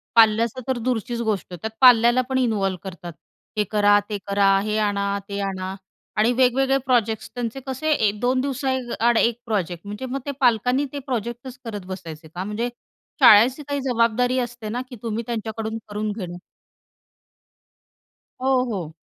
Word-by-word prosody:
पाल्याचा 230 Hz, +2 st, +4 dB
तर 260 Hz, -2 st, 0 dB
दूरचीच 235 Hz, 0 st, -2 dB
गोष्ट. 205 Hz, -6 st, -2 dB
त्यात 200 Hz, +6 st, -4 dB
पाल्याला 240 Hz, 0 st, +7 dB
पण 260 Hz, -, +1 dB
इन्व्हॉल्व 205 Hz, -7 st, +1 dB
करतात 175 Hz, -2 st, -8 dB, 0.4 s
हे 210 Hz, -, +3 dB
करा, 205 Hz, -1 st, +5 dB
ते 205 Hz, -, -2 dB
करा, 200 Hz, -1 st, +4 dB
हे 215 Hz, +1 st, -1 dB
आणा, 200 Hz, -1 st, 0 dB
ते 200 Hz, 0 st, -3 dB
आणा, 190 Hz, -1 st, -3 dB, 0.4 s
आणि 220 Hz, +3 st, +4 dB
वेगवेगळे 260 Hz, +2 st, +3 dB
प्रोजेक्ट्स. 225 Hz, -4 st, +1 dB
त्यांचे 245 Hz, +1 st, -3 dB
कसे 310 Hz, +4 st, -1 dB
1-2 245 Hz, +1 st, +1 dB
दिवसाआड 260 Hz, -4 st, 0 dB
एक 235 Hz, +1 st, +2 dB
प्रोजेक्ट. 185 Hz, -5 st, -2 dB
म्हणजे 210 Hz, +5 st, -5 dB
मग 275 Hz, +2 st, -2 dB
ते 285 Hz, -, -2 dB
पालकांनी 250 Hz, +3 st, +3 dB
ते 285 Hz, -, -3 dB
प्रोजेक्टच 245 Hz, 0 st, -5 dB
करत 205 Hz, -4 st, -6 dB
बसायचे 170 Hz, -4 st, -8 dB
का? 175 Hz, +4 st, -6 dB
म्हणजे 210 Hz, +4 st, -2 dB, 0.5 s
शाळेची 240 Hz, +7 st, +7 dB
काही 285 Hz, -1 st, -2 dB
जबाबदारी 245 Hz, 0 st, +1 dB
असते 240 Hz, -3 st, -4 dB
ना, 245 Hz, +3 st, -2 dB
की 250 Hz, -, -8 dB
तुम्ही 230 Hz, 0 st, -2 dB
त्यांच्याकडून 220 Hz, -1 st, -3 dB
करून 210 Hz, 0 st, -3 dB
घेणं. 180 Hz, -5 st, -6 dB, 2.0 s
हो, 260 Hz, -1 st, +3 dB
हो. 175 Hz, -7 st, -4 dB
225 Hz, 150 wpm, -23 LUFS, 205-250 Hz, 2.0 s, पाल्याला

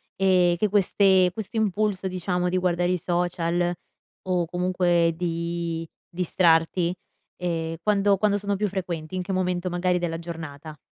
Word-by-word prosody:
ehm, 180 Hz, -2 st, +3 dB
che 210 Hz, +4 st, +1 dB
queste 190 Hz, -2 st, +4 dB
questo 220 Hz, +3 st, -6 dB
impulso, 205 Hz, -2 st, 0 dB
diciamo, 180 Hz, -1 st, -1 dB
di 185 Hz, -, 0 dB
guardare 175 Hz, -1 st, +1 dB
i 180 Hz, -, 0 dB
social, 175 Hz, 0 st, 0 dB, 0.5 s
o 180 Hz, -2 st, +1 dB
comunque 175 Hz, -1 st, +1 dB
di 170 Hz, -1 st, -3 dB, 0.2 s
distrarti 170 Hz, 0 st, +2 dB, 0.4 s
ehm, 165 Hz, -2 st, -2 dB
quando 205 Hz, -1 st, +3 dB
quando 205 Hz, 0 st, +2 dB
sono 200 Hz, 0 st, -2 dB
più 210 Hz, +1 st, 0 dB
frequenti, 175 Hz, -3 st, -4 dB
in 185 Hz, -, -2 dB
che 195 Hz, -, -5 dB
momento 180 Hz, -1 st, -1 dB
magari 180 Hz, 0 st, +1 dB
della 170 Hz, -2 st, -2 dB
giornata? 160 Hz, -3 st, -8 dB
180 Hz, 145 wpm, -25 LUFS, 170-190 Hz, 0.5 s, queste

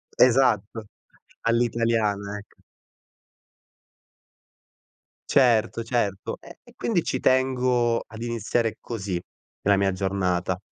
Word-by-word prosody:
esatto, 115 Hz, -4 st, +3 dB, 0.6 s
all'italiana, 115 Hz, -3 st, 0 dB
ec 105 Hz, -, -15 dB, 2.7 s
Certo, 115 Hz, -3 st, +3 dB
certo. 110 Hz, -5 st, -2 dB
E -, -, -14 dB
e -, -, -19 dB
quindi 185 Hz, -8 st, 0 dB
ci 130 Hz, -, -2 dB
tengo 125 Hz, -2 st, +2 dB
ad 110 Hz, +1 st, -10 dB
iniziare 115 Hz, -1 st, -1 dB
così 100 Hz, -6 st, -4 dB, 0.4 s
la 100 Hz, 0 st, +4 dB
mia 100 Hz, 0 st, +2 dB
giornata. 95 Hz, -1 st, -1 dB
115 Hz, 90 wpm, -25 LUFS, 100-120 Hz, 2.7 s, la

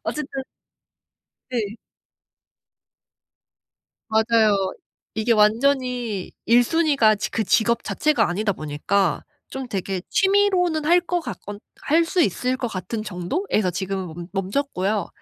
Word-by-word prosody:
어쨌든 285 Hz, -2 st, -4 dB, 1.1 s
네. 220 Hz, -4 st, -2 dB, 2.3 s
맞아요. 220 Hz, -3 st, +3 dB, 0.4 s
이게 220 Hz, +2 st, 0 dB
완전히 235 Hz, -1 st, +1 dB
1 240 Hz, +1 st, +5 dB
순위가 280 Hz, -7 st, +3 dB
직 210 Hz, +1 st, -4 dB
그 220 Hz, -, 0 dB
직업 235 Hz, +2 st, +2 dB
자체가 305 Hz, -8 st, +1 dB
아니다 200 Hz, +4 st, 0 dB
보니까 155 Hz, +4 st, -1 dB, 0.3 s
좀 265 Hz, -1 st, -6 dB
되게 195 Hz, -3 st, -3 dB
취미로는 380 Hz, -5 st, +2 dB
할 345 Hz, +3 st, +5 dB
거 355 Hz, 0 st, -1 dB
같 -, -, -6 dB
건 205 Hz, 0 st, -7 dB, 0.2 s
할 330 Hz, +3 st, +3 dB
수 350 Hz, +2 st, +1 dB
있을 255 Hz, -, 0 dB
것 250 Hz, -, -2 dB
같은 215 Hz, +2 st, -4 dB
정도에서 210 Hz, -, -1 dB
지금은 190 Hz, -1 st, -4 dB
멈 175 Hz, -1 st, -7 dB
멈췄고요. 200 Hz, 0 st, -1 dB
220 Hz, 230 characters per minute, -23 LUFS, 195-280 Hz, 2.3 s, 1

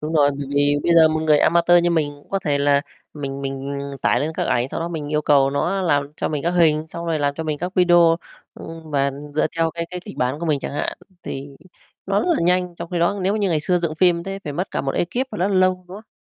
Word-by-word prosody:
Đúng 155 Hz, +2 st, -4 dB
rồi, 145 Hz, -2 st, +4 dB
bởi 140 Hz, -, -4 dB
vì 145 Hz, 0 st, +3 dB
bây 170 Hz, -, +2 dB
giờ 160 Hz, -1 st, +7 dB
một 155 Hz, 0 st, -1 dB
người 150 Hz, -2 st, +4 dB
a -, -, +4 dB
ma 170 Hz, +1 st, +3 dB
tơ 175 Hz, 0 st, +6 dB
như 175 Hz, 0 st, +3 dB
mình 155 Hz, -3 st, +1 dB
cũng 145 Hz, -, -20 dB
có 195 Hz, -, 0 dB
thể 145 Hz, -6 st, -1 dB
là 140 Hz, 0 st, +3 dB, 0.3 s
mình 140 Hz, -2 st, -5 dB
mình 135 Hz, +1 st, -4 dB, 0.3 s
tải -, -, +2 dB
lên 155 Hz, +2 st, -2 dB
các -, -, -2 dB
ảnh, 120 Hz, +1 st, 0 dB
sau -, -, -5 dB
đó 170 Hz, -, -2 dB
mình 155 Hz, -4 st, -5 dB
yêu 150 Hz, 0 st, +1 dB
cầu 140 Hz, -2 st, +4 dB
nó 175 Hz, +7 st, -1 dB
làm 145 Hz, -4 st, 0 dB
cho -, -, -2 dB
mình 150 Hz, -2 st, -3 dB
các 170 Hz, -, +1 dB
hình, 160 Hz, -3 st, +2 dB
xong 170 Hz, +1 st, -7 dB
rồi 160 Hz, -2 st, 0 dB
làm 145 Hz, -1 st, 0 dB
cho 160 Hz, -, -4 dB
mình 150 Hz, -2 st, -2 dB
các 180 Hz, +2 st, -4 dB
video, 175 Hz, -2 st, +5 dB, 0.4 s
ưm, 165 Hz, -1 st, -10 dB
mà 140 Hz, -1 st, +1 dB, 0.2 s
dựa 155 Hz, -, +2 dB
theo 165 Hz, 0 st, +1 dB
cái 170 Hz, +1 st, -5 dB
cái 180 Hz, -, -5 dB
kịch 205 Hz, +2 st, -11 dB
bản 130 Hz, +4 st, -1 dB
của 170 Hz, -, -3 dB
mình 145 Hz, -3 st, +1 dB
chẳng -, -, -5 dB
hạn, 145 Hz, -, -3 dB, 0.2 s
thì 140 Hz, +1 st, -6 dB, 0.6 s
nó -, -, +1 dB
rất -, -, -2 dB
là 340 Hz, -, +3 dB
nhanh, 180 Hz, 0 st, +1 dB
trong 170 Hz, +1 st, -8 dB
khi 175 Hz, -, -1 dB
đó 200 Hz, +4 st, +1 dB
nếu 195 Hz, +3 st, +1 dB
như 205 Hz, -3 st, 0 dB
ngày 155 Hz, -3 st, +1 dB
xưa 180 Hz, +3 st, +1 dB
dựng 170 Hz, -2 st, -2 dB
phim 170 Hz, 0 st, +3 dB
thế 195 Hz, 0 st, -5 dB
phải 145 Hz, -, -4 dB
mất 180 Hz, +6 st, -3 dB
cả -, -, -2 dB
một 135 Hz, 0 st, -2 dB
ekip 245 Hz, +10 st, -1 dB
và -, -, -6 dB
nó 185 Hz, +3 st, +1 dB
lâu, 185 Hz, -1 st, +3 dB
đúng 190 Hz, -, -8 dB
không? 215 Hz, +1 st, -13 dB
160 Hz, 290 wpm, -21 LUFS, 145-175 Hz, 0.6 s, giờ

